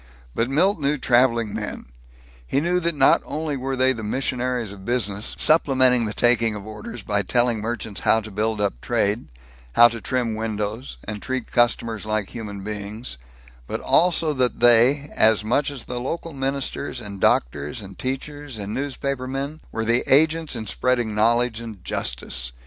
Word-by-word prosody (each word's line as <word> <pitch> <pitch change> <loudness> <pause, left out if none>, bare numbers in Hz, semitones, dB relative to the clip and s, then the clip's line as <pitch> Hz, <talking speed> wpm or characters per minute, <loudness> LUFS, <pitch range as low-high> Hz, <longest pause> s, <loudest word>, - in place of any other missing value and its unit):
But 115 +2 0
Milt 170 +7 +2
knew 145 +1 +1
traveling 120 -4 +2
men. - - -5 0.6
He 135 - +1
knew 175 +4 +1
that 170 -2 -1
not 135 -2 +5
only 155 -1 -3
were 135 0 -3
they 130 +1 +3
the 115 - -7
missionaries 125 0 -2
of 100 -1 -11
business, 105 -3 -2
supplementing 130 -6 +4
the 105 - -3
taking 115 -2 +3
of 105 -1 -8
orders 110 +1 -8
by 100 0 0
telling 120 +2 +1
merchants 115 -2 -3
how 110 - +4
to 110 0 -10
build 110 +2 -1
up 100 -13 -1
trade, 105 +4 0 0.5
how 120 0 +8
to 115 -1 -7
trim 125 -2 -1
windows 110 +2 -4
and 105 -1 -6
treat 130 -2 -4
customers 115 -2 +1
like 110 -2 -2
human 105 -4 -7
beings; 105 - -6 0.5
but - - -3
also 165 -3 +3
that 130 -3 0
they, 120 +4 +5
as 110 -1 +4
much 130 +7 +1
as 140 -4 -7
the 125 - -4
local 165 +6 -4
ministers 135 -1 -3
and 100 -4 -8
doctors 70 - +1
and 95 -2 -10
teachers 140 0 -5
and 100 0 -5
newspapermen, 140 +2 -3
were 110 - -3
the 120 +2 +2
agents 155 +1 +3
in 110 -2 -4
spreading 120 +1 0
knowledge 115 +2 +2
and 110 -6 -9
justice. - - -3
120 Hz, 165 wpm, -23 LUFS, 105-135 Hz, 0.6 s, how